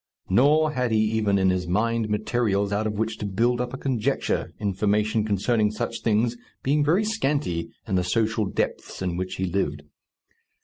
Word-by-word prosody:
Nor 150 +8 +4
had 125 -4 0
he 110 - +2
even 105 -3 +2
in 95 -1 +3
his 90 -1 -1
mind 110 +4 0
materials 105 -2 0
out 105 +2 0
of 105 - -2
which 110 +1 -2
to 105 - -3
build 120 +5 +1
up 125 0 -3
a 130 - -5
conjecture, 130 -6 -1
information 105 +2 +1
concerning 105 +1 +1
such 110 +2 -4
things 115 +2 +1 0.3
being 145 +2 +2
very 175 +9 +2
scanty 145 - -1 0.2
in - - -3
the 90 -1 +2
social 110 +3 0
depths 95 - -3
in 90 -2 -1
which 95 +1 -3
he 95 - -1
lived. 85 -5 -2
110 Hz, 175 wpm, -25 LUFS, 100-120 Hz, 0.3 s, Nor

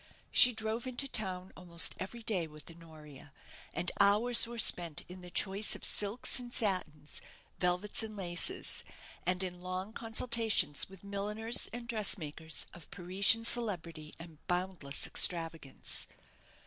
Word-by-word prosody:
She 250 - +8
drove 220 +2 -3
into 255 +2 -2
town 190 -7 -2
almost 175 -1 +1
every 230 +5 -7
day 185 -7 -1
with 155 +2 -12
Honoria, 155 -4 -14 0.4
and 175 +2 +2
hours 220 +4 +5
were 235 0 -8
spent 175 -7 +4
in 180 +1 -11
the 180 - -11
choice 195 +3 +2
of - - -1
silks 210 +5 0
and 245 -1 -9
satins, 170 -10 -2 0.4
velvets 180 +5 0
and 215 -1 -7
laces, 175 -2 -3 0.4
and 180 +1 +2
in 180 -1 -6
long 185 +3 -5
consultations 225 - 0
with 195 -1 -14
milliners 210 +3 +1
and 240 0 -7
dressmakers 160 -8 +1
of 170 -3 -13
Parisian 190 +5 +3
celebrity 170 -10 -3
and 165 -2 -12
boundless 175 -6 -2
extravagance. 165 -5 0
185 Hz, 135 wpm, -32 LUFS, 170-220 Hz, 0.4 s, She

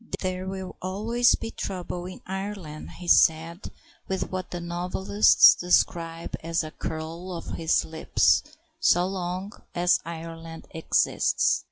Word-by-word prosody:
"There 185 0 -3
will 190 -1 -6
always 220 +6 +2
be 225 - -6
trouble 180 -2 -5
in 185 - -10
Ireland," 190 -5 -6
he 180 - -9
said, 165 +2 +3 0.4
with 190 -1 -3
what 185 -1 -4
the 175 - -5
novelists 180 +4 +4
describe 170 -2 0
as 165 +1 0
a 155 - -7
curl 160 +4 -6
of 170 -2 -6
his 165 -1 +1
lip, 160 0 -11 0.6
"so 180 - +4
long 185 +1 -4 0.2
as 175 +1 +3
Ireland 165 0 -8
exists." 160 - +1
175 Hz, 130 wpm, -26 LUFS, 165-190 Hz, 0.6 s, novelists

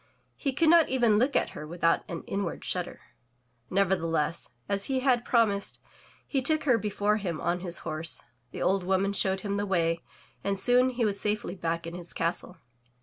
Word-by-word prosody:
He 275 - -1
could 315 +5 +3
not 335 -2 +6
even 235 -5 +3
look 265 +4 +1
at - - +2
her 150 - -8
without 165 0 +1
an 170 -2 -5
inward 195 -3 -3
shudder. - - -3 0.7
Nevertheless, 165 -5 0 0.2
as 200 0 -1
he 265 -1 0
had 250 -3 +3
promised, 215 -5 +1 0.5
he 270 - -1
took 310 +4 +2
her 250 -6 +3
before 210 +1 0
him 175 -7 -3
on 175 +1 0
his 175 -1 -3
horse, 160 0 -2 0.3
the - - -5
old 195 0 +2
woman 190 +2 +1
showed 190 -1 +1
him 200 0 -2
the 205 0 -1
way, 165 -3 +1 0.4
and 195 -1 -1
soon 250 +4 +4
he 245 -2 0
was 200 -1 -1
safely 210 0 -2
back 170 -2 -3
in 170 - -6
his 175 -1 -8
castle. 170 +2 -2
195 Hz, 185 wpm, -28 LUFS, 170-235 Hz, 0.7 s, not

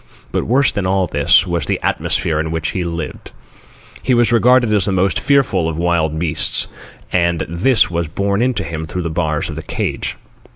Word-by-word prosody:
But - - -1
worse 135 +4 +3
than 100 -2 -2
all 95 0 +1
this, 85 - +3
was 85 -4 -2
the - - 0
atmosphere 75 -2 0
in 80 +1 -2
which 80 -1 -2
he 90 - -2
lived. 85 -2 -6 0.7
He 125 - +1
was 120 -1 +3
regarded 120 -1 +4
as 100 -4 +3
the 100 - 0
most 95 0 +1
fearful 115 - +2
of 80 - -5
wild 85 -2 0
beasts, 80 -1 0 0.5
and 85 -2 +1
this 95 +7 +2
was 85 -1 -1
borne 100 +6 -1
in 125 0 +1
to 100 - -2
him 80 -2 -5
through 90 +2 -4
the 85 - -3
bars 80 -2 -1
of - - -6
the - - -5
cage. - - -3
90 Hz, 200 wpm, -17 LUFS, 80-105 Hz, 0.7 s, regarded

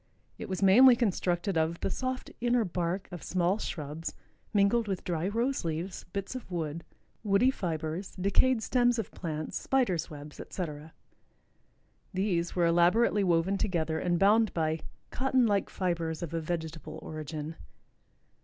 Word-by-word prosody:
It - - -6
was 190 +1 -2
mainly 245 +7 +8
constructed 185 -5 0
of 160 +2 0
"the - - -1
soft 255 0 -3
inner 240 -1 +2
bark 180 +1 -2
of 175 - -7
small 185 +3 +1
shrubs 160 -4 -5 0.4
mingled 210 +3 +3
with 190 -3 -2
dry 170 0 -1
rose 235 +6 0
leaves, 165 +3 -4
bits 195 +4 -5
of 255 -5 -7
wood, 165 -2 -3 0.4
woody 215 +5 +4
fibers, 165 -2 -4
decayed 220 +6 +2
stems 245 0 +3
of 225 - -3
plants, 155 -3 -4
spiders' 195 -13 +1
webs, 150 -1 -10
etc." 155 -3 -6 1.2
These 180 -3 0
were 175 -2 +3
elaborately 180 +6 +4
woven 180 +2 +2
together 160 -5 0
and 175 0 +1
bound 210 +3 +4
by 160 -1 0 0.3
"cotton 260 -1 +2
like 205 -3 +1
fibers 170 -3 -2
of 170 - -5
a 165 - -1
vegetable 160 -1 -4
origin." 155 0 -6
180 Hz, 145 wpm, -30 LUFS, 165-210 Hz, 1.2 s, mainly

